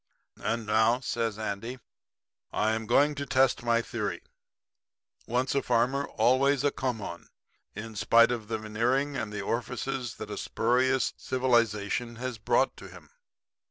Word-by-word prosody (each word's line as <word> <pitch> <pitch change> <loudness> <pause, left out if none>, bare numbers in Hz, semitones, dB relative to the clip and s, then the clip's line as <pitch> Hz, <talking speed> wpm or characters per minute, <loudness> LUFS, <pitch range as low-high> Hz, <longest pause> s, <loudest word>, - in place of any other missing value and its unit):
And 115 +1 -1
now,' 110 +3 +3
says 115 -4 -2
Andy, 110 +4 -4 0.7
'I 110 +1 +1
am 110 0 -2
going 145 +5 +4
to 140 -1 -5
test 130 -1 +3
my 115 -1 +2
theory - - -4 1.0
"Once 125 +3 0
a 140 - +2
farmer, 125 +3 +1
always 135 +2 +2
a 145 - +3
come 125 -5 -2
on," 85 -2 -7 0.5
in 110 +2 -7
spite 115 +4 +5
of 115 -3 -3
the 110 - -2
veneering 120 +7 0
and 105 - -3
the 105 -1 -4
orifices 125 +3 -3
that - - -7
a - - -4
spurious 130 +3 +1
civilization 120 -2 0
has 125 -1 -5
brought 120 +5 +2
to - - -10
him.' - - -14
120 Hz, 150 wpm, -28 LUFS, 110-130 Hz, 1.0 s, spite